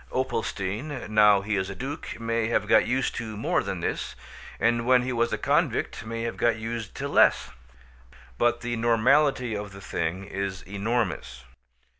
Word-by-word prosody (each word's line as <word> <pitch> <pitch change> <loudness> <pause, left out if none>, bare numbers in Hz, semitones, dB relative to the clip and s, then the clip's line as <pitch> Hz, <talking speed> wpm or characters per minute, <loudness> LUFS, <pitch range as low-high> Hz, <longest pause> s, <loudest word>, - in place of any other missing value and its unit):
Opalstein, 120 +1 -3
now 105 -2 +5
he 105 +1 -1
is 95 0 -1
a 100 - -6
duke, 140 +4 -6
may 115 -1 0
have 115 - 0
got - - +5
used 130 0 0
to 110 -2 -5
more 110 - +1
than - - -4
this; - - -3 0.4
and 115 0 +1
when 125 -1 +5
he 130 0 -2
was 115 0 +1
a - - 0
convict - - 0
may 115 0 -4
have 115 - -3
got 120 -1 +2
used 110 -1 -5
to - - -3
less. - - +4 0.9
But 120 0 +2
the 120 0 -2
normality 120 +2 +3
of 105 -1 -6
the 100 - -10
thing 85 +1 -3
is 100 -1 -4
enormous. 100 - -2
115 Hz, 170 wpm, -26 LUFS, 100-120 Hz, 0.9 s, now